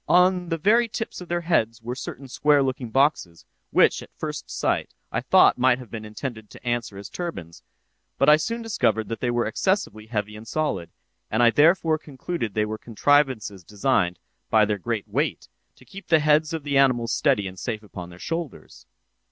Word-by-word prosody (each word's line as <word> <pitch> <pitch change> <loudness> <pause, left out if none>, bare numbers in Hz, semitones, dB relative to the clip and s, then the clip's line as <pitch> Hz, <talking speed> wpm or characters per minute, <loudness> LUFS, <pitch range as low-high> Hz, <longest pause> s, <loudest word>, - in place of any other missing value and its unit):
On 180 0 +4
the 165 - 0
very 225 +8 +3
tips 225 -3 -5
of 180 - -9
their 175 0 -1
heads 115 -9 +1
were 120 +2 -3
certain 135 +1 -7
square 145 +2 +3
looking 130 -2 -3
boxes, 135 - +1 0.2
which, - - +4
at - - -12
first - - -5
sight, - - -1 0.2
I - - -1
thought - - +5
might 125 0 +4
have 125 -3 -12
been 110 -2 -6
intended 110 0 -7
to 125 - -13
answer 120 -4 -2
as 100 0 -8
turbans, 125 - -6 0.6
but - - +2
I 150 0 +8
soon 230 +8 -3
discovered 110 - 0
that 115 - -4
they 125 - -1
were 120 0 +1
excessively 110 - -1
heavy 105 -2 -3
and 110 +1 -11
solid, 130 - -2 0.4
and 110 +3 +2
I 120 - +6
therefore 160 +2 +4
concluded 140 - -5
they 105 0 +2
were 110 0 -5
contrivances 120 -5 +1
designed, 100 -3 0 0.3
by 110 -1 +5
their 105 -1 -2
great 115 0 -3
weight, - - -2 0.3
to - - -20
keep 195 -1 -11
the 160 - +5
heads 155 +1 +3
of 160 -3 -4
the 140 -1 +1
animals 120 -4 +3
steady 100 -1 +2
and 95 0 -9
safe 110 -3 -4
upon 90 -4 -9
their 90 - -13
shoulders. 165 - -6
125 Hz, 195 wpm, -24 LUFS, 110-155 Hz, 0.6 s, I